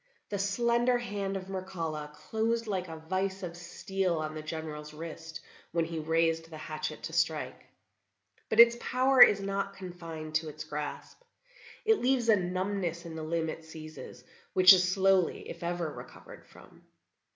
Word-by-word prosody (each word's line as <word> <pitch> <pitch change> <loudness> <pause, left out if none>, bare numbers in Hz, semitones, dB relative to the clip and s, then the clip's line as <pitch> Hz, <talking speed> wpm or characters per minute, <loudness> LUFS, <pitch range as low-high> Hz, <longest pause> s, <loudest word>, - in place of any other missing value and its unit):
The 200 - -2
slender 235 +5 +2
hand 200 -4 -3
of 185 - -7
Mircalla 165 -6 -4
closed 230 +1 -1
like 190 -4 -2
a 160 -1 -7
vice 190 +4 -2
of 170 -1 -5
steel 185 +1 -2
on 155 0 -3
the 155 - -5
General's 155 -1 -6
wrist 160 0 -8 0.3
when 170 -1 +1
he 165 0 -4
raised 165 +1 +1
the 160 - -9
hatchet 155 0 -5
to - - -5
strike. - - -1 0.8
But 220 - 0
its 235 0 +9
power 255 +1 +3
is 200 - +9
not 195 0 -2
confined 165 -4 -8
to 160 -1 -5
its 155 +1 -7
grasp; 150 - -6 0.6
it 445 -1 +4
leaves 250 -2 +2
a 220 - +8
numbness 185 -2 -2
in 165 -1 -7
the 160 - -5
limb 160 +1 -1
it 160 - -6
seizes, 160 0 -10 0.3
which 185 0 +9
is 180 -1 +3
slowly, 190 -2 +2
if 170 - -8
ever, 170 -2 -2
recovered - - -12
from." - - -17
175 Hz, 165 wpm, -30 LUFS, 160-195 Hz, 0.8 s, its